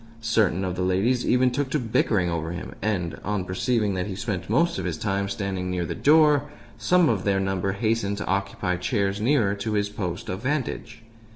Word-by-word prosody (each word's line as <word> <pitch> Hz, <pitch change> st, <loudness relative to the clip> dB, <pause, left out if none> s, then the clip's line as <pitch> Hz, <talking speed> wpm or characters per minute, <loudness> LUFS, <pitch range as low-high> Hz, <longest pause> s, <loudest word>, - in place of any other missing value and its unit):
Certain 105 Hz, -5 st, +2 dB
of 90 Hz, -1 st, -2 dB
the 90 Hz, -, -3 dB
ladies 100 Hz, +7 st, +1 dB
even 125 Hz, 0 st, +3 dB
took 135 Hz, +2 st, -1 dB
to 150 Hz, -, +1 dB
bickering 110 Hz, -6 st, +1 dB
over 85 Hz, -1 st, -2 dB
him, 90 Hz, -, -7 dB
and, 95 Hz, -5 st, -2 dB
on 105 Hz, -3 st, -2 dB
perceiving 105 Hz, +3 st, 0 dB
that 90 Hz, +1 st, -2 dB
he 95 Hz, -, -4 dB
spent 100 Hz, -4 st, -4 dB
most 165 Hz, +10 st, +2 dB
of -, -, -4 dB
his 85 Hz, -3 st, -2 dB
time 100 Hz, +1 st, -1 dB
standing 95 Hz, -2 st, -3 dB
near 90 Hz, -1 st, -1 dB
the -, -, -3 dB
door, 150 Hz, -1 st, +4 dB, 0.3 s
some 180 Hz, -2 st, +4 dB
of 105 Hz, -5 st, +1 dB
their 100 Hz, -1 st, +1 dB
number 95 Hz, 0 st, -1 dB
hastened 100 Hz, -1 st, 0 dB
to -, -, -4 dB
occupy 95 Hz, -1 st, -1 dB
chairs 100 Hz, +1 st, -1 dB
nearer 115 Hz, -5 st, +2 dB
to 105 Hz, +2 st, -3 dB
his 105 Hz, -1 st, 0 dB
post 95 Hz, -4 st, -4 dB
of 95 Hz, +2 st, -4 dB
vantage. 125 Hz, -4 st, -3 dB
100 Hz, 200 wpm, -25 LUFS, 95-115 Hz, 0.3 s, door